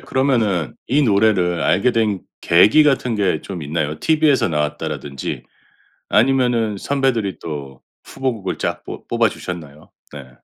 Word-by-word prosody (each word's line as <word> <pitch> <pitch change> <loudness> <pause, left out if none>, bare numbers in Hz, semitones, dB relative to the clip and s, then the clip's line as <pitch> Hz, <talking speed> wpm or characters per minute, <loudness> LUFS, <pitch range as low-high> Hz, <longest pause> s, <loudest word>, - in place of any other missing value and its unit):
그러면은 110 - 0
이 145 +4 +2
노래를 100 -6 +2
알게 100 +7 +2
된 110 -4 0 0.2
계기 100 - +5
같은 135 -5 +1
게 95 -7 0
좀 90 -5 -7
있나요? 75 +1 -2
TV에서 155 -6 +3
나왔다라든지. 75 -3 -3 0.7
아니면은 120 -3 +2
선배들이 125 -7 -1
또 70 -5 -7 0.2
후보곡을 120 -8 -3
쫙 - - -3
뽀 - - -9
뽑아 - - +2
주셨나요? 75 -4 -8 0.2
네. 70 -3 -10
100 Hz, 300 characters per minute, -19 LUFS, 80-125 Hz, 0.7 s, 계기